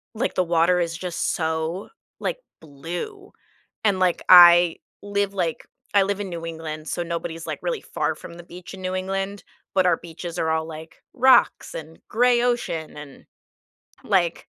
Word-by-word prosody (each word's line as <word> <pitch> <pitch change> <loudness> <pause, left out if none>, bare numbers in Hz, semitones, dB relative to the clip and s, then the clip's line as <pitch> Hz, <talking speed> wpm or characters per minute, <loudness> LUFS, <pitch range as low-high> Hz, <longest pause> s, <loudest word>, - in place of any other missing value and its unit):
like, 225 - -2
the 185 - +2
water 170 +1 +3
is 165 -1 -2
just 180 -2 -2
so, 160 +3 -2 0.3
like, - - -2 0.2
blue 175 - -7 0.5
and, 200 -3 +2
like, 180 -2 +2
I 175 -1 +9 0.2
live, 200 -1 -1
like 170 -4 -2 0.3
I 200 - +5
live 200 +1 -2
in 195 - -5
New 165 -1 -6
England, 160 -1 -6
so 175 - -2
nobody's, 165 -1 -5
like, - - -4
really - - -2
far - - -2
from 170 - -11
the 175 0 -12
beach 180 +2 -11
in 190 - -9
New 185 0 -3
England, 195 +1 -3 0.3
but 185 -1 +4
our 175 -2 +3
beaches 170 0 -8
are 160 - 0
all, 160 0 0
like, 160 0 -10 0.2
rocks 260 +1 +4
and 160 +1 -9
gray 240 +1 +3
ocean 240 -12 -2
and, 150 -2 -11 0.8
like, 180 -5 +1
175 Hz, 170 wpm, -23 LUFS, 165-195 Hz, 0.8 s, I